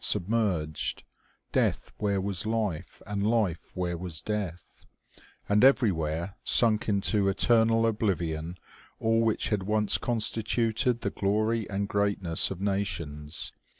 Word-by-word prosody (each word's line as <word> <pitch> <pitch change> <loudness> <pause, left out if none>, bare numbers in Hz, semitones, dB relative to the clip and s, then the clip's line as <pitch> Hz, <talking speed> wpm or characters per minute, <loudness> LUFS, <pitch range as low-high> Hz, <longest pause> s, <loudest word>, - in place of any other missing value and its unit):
submerged; 95 -6 0 0.5
death - - 0
where 100 -2 0
was 100 +1 -2
life, 105 -7 -3
and 100 0 -3
life 105 -6 0
where 90 -1 -2
was 85 -2 -6
death; 100 -5 -5 0.6
and 105 +2 +3
everywhere 85 - +2
sunk 110 -2 +3
into 100 0 +2
eternal 115 +3 +3
oblivion 90 -7 -1 0.4
all 115 0 +2
which 115 -1 +1
had 105 -3 0
once 105 +2 +1
constituted 115 +1 +1
the - - -2
glory 110 +3 0
and 100 0 -2
greatness 100 -5 +1
of 95 - -6
nations. 85 -7 -2
100 Hz, 115 wpm, -28 LUFS, 90-110 Hz, 0.6 s, and